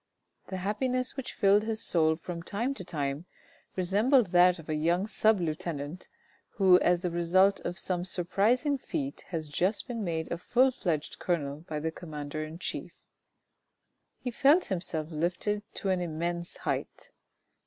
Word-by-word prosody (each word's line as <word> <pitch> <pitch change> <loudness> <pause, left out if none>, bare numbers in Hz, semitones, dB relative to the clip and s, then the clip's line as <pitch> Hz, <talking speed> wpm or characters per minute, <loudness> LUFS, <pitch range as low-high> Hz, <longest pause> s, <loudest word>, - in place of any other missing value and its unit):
The 190 - -4
happiness 250 +7 -1
which 270 -2 -6
filled 200 0 +5
his 220 0 -2
soul 160 -2 +3
from 170 +1 -6
time 230 +10 -2
to 200 - -6
time 145 -1 -3 0.5
resembled 205 +4 +3
that 180 0 +6
of 165 - -12
a 155 - -1
young 170 +5 +1
sub 215 -1 +3
lieutenant 155 -1 -4 0.5
who 185 -2 +6
as 175 -1 +2
the 180 -2 -1
result 185 +4 +3
of 175 +1 -5
some 175 -1 -1
surprising 215 - +1
feat 280 0 -4
has 160 -3 -4
just 185 - 0
been 235 -4 -3
made 160 -3 -3
a 170 - -2
full 255 +7 +3
fledged 165 - -3
colonel 145 -5 -1
by 155 -1 -2
the 160 +2 -2
commander 155 -2 -6
in 155 +1 -7
chief; 180 - -6 1.1
he 250 - -4
felt 285 +9 +4
himself 170 -3 -2
lifted 175 +6 -1
up - - -20
to 195 - -2
an 185 -1 +1
immense 170 +1 -3
height. - - -4
180 Hz, 160 wpm, -29 LUFS, 165-210 Hz, 1.1 s, that